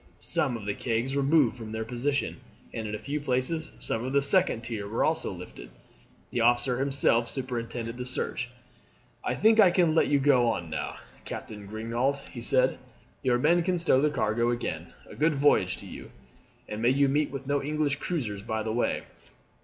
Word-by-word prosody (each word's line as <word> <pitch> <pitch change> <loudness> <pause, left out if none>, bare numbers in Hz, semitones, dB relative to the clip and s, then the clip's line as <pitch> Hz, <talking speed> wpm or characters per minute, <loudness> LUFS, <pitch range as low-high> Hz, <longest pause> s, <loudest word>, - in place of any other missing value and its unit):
Some 125 -3 +2
of 110 - -9
the 100 - -1
kegs 120 +4 -2
were 140 - +2
moved 140 -3 +3
from 110 -2 -8
their 110 0 -3
position, 130 +4 -1 0.4
and 110 -1 -4
in 105 - -3
a - - -3
few 145 +6 -4
places 145 +4 -1
some 115 - -2
of 130 +2 -3
the 140 - +4
second 140 -4 +3
tier 115 -4 -5
were 110 +3 0
also 160 +1 0
lifted. 90 -9 -10 0.6
The 120 - 0
officer 120 +2 +3
himself 135 -4 +2
superintended 120 -2 -3
the 125 - -4
search. 125 0 -1 0.7
"I - - -1
think 220 +1 +4
I 200 -4 +8
can 175 -3 +3
let 160 - +3
you 145 - +3
go 135 -3 +4
on 90 -8 -2
now, - - -3 0.3
Captain 105 -2 -7
Grignaud," 115 +6 -1
he 120 - -7
said. 130 +2 +2 0.4
"Your 125 -2 +2
men 165 +7 +3
can 180 +1 0
stow 165 -6 +3
the 150 - +3
cargo 115 -3 0
again. 120 0 -3 0.2
A - - -12
good 155 0 +1
voyage 135 -10 +3
to - - -10
you, - - -9 0.6
and 105 +1 -5
may 120 - +4
you 140 +2 +3
meet 145 +2 +1
with 135 0 -7
no 140 +1 0
English 150 -1 -1
cruisers 120 - -3
by 110 +1 -3
the 110 0 -2
way." 120 - 0
125 Hz, 195 wpm, -28 LUFS, 115-145 Hz, 0.7 s, I